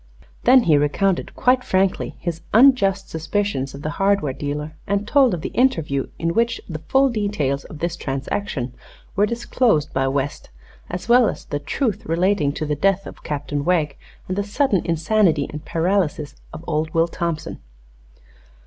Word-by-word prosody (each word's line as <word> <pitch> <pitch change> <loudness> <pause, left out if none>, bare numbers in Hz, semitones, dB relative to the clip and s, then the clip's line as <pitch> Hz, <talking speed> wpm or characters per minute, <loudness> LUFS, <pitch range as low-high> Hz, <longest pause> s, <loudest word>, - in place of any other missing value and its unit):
Then 255 0 +7
he 155 -6 +4
recounted, 175 +6 0
quite 250 0 +3
frankly, 190 -2 0
his 170 -2 -4
unjust 210 -6 +5
suspicions 160 -4 -2
of 140 - -10
the 155 - -2
hardware 195 -8 +2
dealer, 150 +3 -4
and 200 +1 -1
told 270 -1 +4
of 165 - -7
the - - -4
interview 160 - +1
in 165 0 -1
which 230 +2 +1
the 155 -3 -5
full 270 - +3
details 180 - -1
of 155 - -10
this 170 +2 -2
transaction 135 - -3 0.4
were 205 +1 +3
disclosed 235 - +1
by 135 0 +1
West, 140 +1 -2 0.4
as 180 +3 -5
well 240 -1 +5
as - - -7
the 145 - -3
truth 210 - -2
relating 170 -2 +2
to 155 - -3
the 150 - -1
death 195 +5 +1
of - - -10
Captain 145 -1 -3
Wegg 155 -4 +1 0.3
and 185 - -2
the 200 - 0
sudden 205 - +1
insanity 165 -2 +2
and 150 +1 -8
paralysis 165 -4 0 0.2
of 160 +1 -9
old 155 0 -2
Will 165 +1 +4
Thompson. 170 -2 -4
170 Hz, 165 wpm, -21 LUFS, 150-205 Hz, 0.4 s, Then